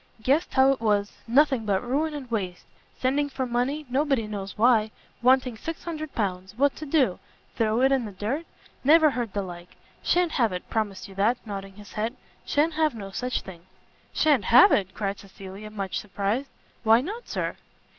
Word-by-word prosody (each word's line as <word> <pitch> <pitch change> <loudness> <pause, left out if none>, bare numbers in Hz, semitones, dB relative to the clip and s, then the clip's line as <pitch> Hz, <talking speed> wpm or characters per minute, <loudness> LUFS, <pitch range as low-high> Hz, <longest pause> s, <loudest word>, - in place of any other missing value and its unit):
guessed 285 +8 +1
how 265 0 +6
it 270 - -2
was; 205 -2 +1 0.2
nothing 265 0 +3
but 200 -1 0
ruin 300 +4 0
and 260 -4 -8
waste; 185 -5 -3 0.3
sending 285 +3 +1
for 265 -1 -3
money, 255 +5 -1
nobody 270 -2 +1
knows 200 -2 -6
why; 220 -1 +4 0.3
wanting 255 -1 +3
600 310 +3 -6
pounds 190 -2 -2
what 280 +1 +3
to 305 - -7
do? 270 - +2 0.4
throw 225 +1 +1
it 265 +1 +4
in 265 -3 +2
the 210 - -6
dirt? 225 - -3 0.4
Never 310 +2 +6
heard 240 -5 -3
the 200 - -1
like! 175 -1 -10 0.3
Sha'n't 350 -1 +2
have 235 -8 +2
it, 180 - -5
promise 200 -4 -2
you 195 - -12
that," 210 +5 +2
nodding 195 -2 -6
his 205 -1 -13
head, 225 +3 -2 0.3
"shan't 310 +3 +1
have 310 -4 +1
no 200 -3 -7
such 250 +5 -2
thing!" 175 -1 -12 0.4
"Sha'n't 290 -10 +3
have 250 - +8
it?" 190 -2 +1
cried 200 -1 -2
Cecilia, 195 +1 -10
much 200 -3 -3
surprised, 210 +6 -2 0.3
"why 225 +1 +6
not, 425 - -6
Sir?" - - -2
235 Hz, 180 wpm, -26 LUFS, 200-275 Hz, 0.4 s, have